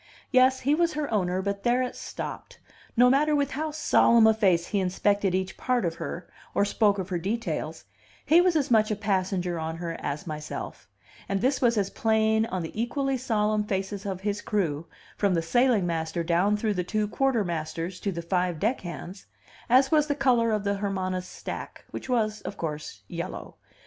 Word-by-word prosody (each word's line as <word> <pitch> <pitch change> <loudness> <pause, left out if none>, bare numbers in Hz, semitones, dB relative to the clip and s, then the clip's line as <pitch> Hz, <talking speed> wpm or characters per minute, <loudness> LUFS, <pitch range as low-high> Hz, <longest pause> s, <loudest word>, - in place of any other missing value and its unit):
Yes, 260 0 +4
he 280 +3 +2
was 335 +1 +2
her 295 -5 -3
owner, 185 -2 0
but 200 0 -2
there 245 +2 +2
it 250 - -4
stopped, - - -7 0.4
no 245 +1 +7
matter 295 +4 +3
with 285 -1 +1
how 310 +3 -2
solemn 235 -6 +4
a 220 - +6
face 185 -6 +2
he 205 - -1
inspected 195 +1 +1
each 185 0 -2
part 250 -5 0
of 165 - 0
her, 170 0 -5 0.3
or 200 - +3
spoke 205 0 +2
of 190 -1 -4
her 180 -2 -1
details; 170 - -3 0.4
he 330 +4 +6
was 360 -2 +2
as 285 -5 +1
much 215 -2 +4
a 215 - 0
passenger 185 -4 -1
on 160 +1 -4
her 165 -1 -4
as 145 +1 -4
myself; 155 -2 -6 0.4
and 195 0 0
this 265 +3 +1
was 235 -3 +3
as 200 -1 0
plain 220 0 +2
on 185 -4 -3
the 160 - -5
equally 270 +3 -1
solemn 215 -4 0
faces 195 -1 -3
of 190 -2 -4
his 205 0 -2
crew, 170 -7 -1 0.3
from 200 -3 +2
the 165 - +1
sailing 240 +1 +3
master 165 0 -2
down 175 +5 +2
through 215 0 0
the 180 -2 -1
two 210 +3 -1
quartermasters 180 - -1
to 200 - -2
the 170 -2 -5
five 180 -1 0
deck 225 +8 0
hands, 175 - -8 0.4
as 260 +2 +5
was 305 -1 +4
the 285 - 0
color 250 -5 +3
of 215 -2 0
the 200 0 0
Hermana's 185 -2 -2
stack, - - -7
which - - -7
was, 215 -4 0
of 200 - -7
course, 150 -2 -5
yellow. 170 +1 -6
205 Hz, 195 wpm, -27 LUFS, 180-240 Hz, 0.4 s, no